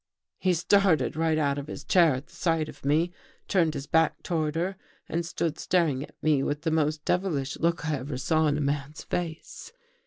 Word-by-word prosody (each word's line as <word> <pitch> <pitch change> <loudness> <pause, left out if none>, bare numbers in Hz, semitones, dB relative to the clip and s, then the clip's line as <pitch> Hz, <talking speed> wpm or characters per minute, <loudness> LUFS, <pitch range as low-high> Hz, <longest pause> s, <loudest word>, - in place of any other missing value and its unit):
" - - -63
He 185 -2 +2
started 170 -6 +3
right 160 0 +1
out 140 -2 +1
of 140 - -7
his - - -7
chair 170 -7 +4
at 130 +3 -6
the - - -23
sight 165 -3 0
of - - -12
me, 155 +5 +2 0.4
turned 165 -5 +2
his 140 0 -4
back 160 +1 +2
toward 155 -3 -1
her 180 +4 -1 0.3
and 170 +1 -1
stood 165 -2 -2
staring 165 -7 +1
at 145 - -9
me 150 -3 +3
with 145 +2 -2
the 160 - 0
most 155 -1 0
devilish 160 -8 0
look 170 0 0
I 155 -2 0
ever 130 0 -5
saw 155 +4 +2
in 145 0 +1
a - - -1
man's 145 +1 -2
face. 170 - -5
155 Hz, 210 wpm, -27 LUFS, 145-170 Hz, 0.4 s, chair